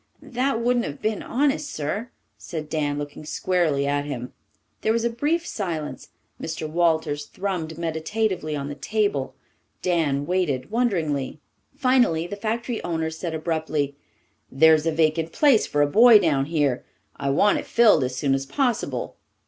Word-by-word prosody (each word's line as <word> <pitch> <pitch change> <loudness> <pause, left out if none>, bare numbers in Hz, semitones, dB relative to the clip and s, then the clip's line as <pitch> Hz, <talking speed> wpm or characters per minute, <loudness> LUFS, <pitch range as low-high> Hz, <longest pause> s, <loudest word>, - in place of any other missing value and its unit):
"That 255 -1 -1
wouldn't 240 0 +1
have 145 - -6
been 215 -1 -1
honest, 285 +3 0
sir," 195 +11 -3 0.3
said 155 -3 -7
Dan, 145 -2 -1
looking 145 +1 -6
squarely 155 -3 0
at 145 0 0
him. 130 -4 -6 0.5
There 220 - +2
was 230 0 0
a 235 - +1
brief 300 +8 0
silence. 165 - -4 0.3
Mr. 160 -1 -4
Walters 160 -3 0
thrummed 175 -5 -4
meditatively 170 +1 -2
on 140 -1 -4
the 145 - -5
table. 200 -6 -1 0.5
Dan 155 -6 +1
waited 150 -7 -1
wonderingly. 165 - 0 0.4
Finally 250 - +3
the 175 - -5
factory 225 +3 -3
owner 160 -2 -2
said 160 0 -4
abruptly, 155 -3 -2 0.6
"There's 160 +3 +5
a - - +3
vacant 160 +1 +1
place 280 -7 +4
for 145 0 +2
a - - +2
boy 225 +8 +8
down 150 -8 +2
here. 145 -5 0 0.3
I 140 - -2
want 200 +9 +3
it - - -8
filled 220 - +5
as 130 0 -2
soon 135 +1 +1
as 135 0 -1
possible. 250 - -1
160 Hz, 155 wpm, -24 LUFS, 145-215 Hz, 0.6 s, boy